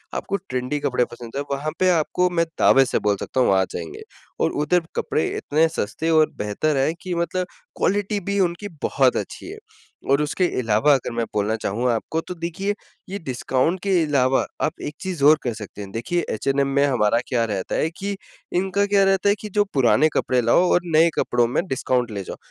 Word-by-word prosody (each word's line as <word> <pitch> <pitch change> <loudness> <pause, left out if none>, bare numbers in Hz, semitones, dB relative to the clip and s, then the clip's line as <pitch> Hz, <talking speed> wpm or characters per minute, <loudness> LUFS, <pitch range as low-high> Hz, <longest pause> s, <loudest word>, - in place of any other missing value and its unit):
आपको 200 - -2
ट्रेंडी 130 +3 -2
कपड़े 125 -3 +1
पसंद 120 +1 -11
हैं। 140 - -1
वहाँ 145 +3 -2
पे 185 - +4
आपको, 180 +1 +2
मैं 170 -1 +1
दावे 135 0 +6
से - - 0
बोल 105 -1 +1
सकता 130 - -1
हूँ 125 - +4
आ 95 - +4
जाएँगे। 85 -2 -6 0.4
और - - +2
उधर 175 +4 +1
कपड़े 155 - 0
इतने 155 +3 +2
सस्ते 160 +2 -3
और 155 -1 +4
बेहतर 120 +9 -1
है 135 +4 +2
कि 185 -2 -4
मतलब 170 +2 -1 0.3
क्वालिटी 205 +1 0
भी 200 +1 -2
उनकी 175 +2 0 0.2
बहुत 135 -2 +3
अच्छी - - -6
है। - - -9 0.5
और 140 +2 +4
उसके 170 +5 0
अलावा 115 +5 +3
अगर 130 -3 -1
मैं 115 0 -1
बोलना 105 +1 0
चाहूँ 120 +5 0
आपको 115 +8 -2
तो 180 - -7
देखिए 190 +5 -2 0.3
ये 200 - -3
डिस्काउंट 130 +3 -1
के 200 - 0
अलावा 135 -3 +2 0.2
आप 155 - -2
एक 150 +1 -5
चीज़ 180 -7 -4
और 155 +1 +7
कर 120 - -1
सकते 105 -1 -9
हैं, 100 -1 -8
देखिए 170 - -2
एचएनएम 135 +5 0
में 140 +1 +4
हमारा 115 -4 +2
क्या 120 -3 +1
रहता 100 -4 -3
है 160 - +1
कि 200 +1 -3 0.4
इनका 195 +2 +1
क्या 200 -1 +3
रहता 195 +1 +3
है 205 - +4
कि 210 - -6
जो 205 - +5
पुराने 135 +3 +4
कपड़े 125 -1 +1
लाओ 120 +9 +4
और 175 - +3
नए 165 +2 +6
कपड़ों 120 -1 +2
में 125 - -1
डिस्काउंट 125 -4 0
ले 100 -2 -4
जाओ। - - -8
145 Hz, 205 wpm, -22 LUFS, 125-180 Hz, 0.5 s, और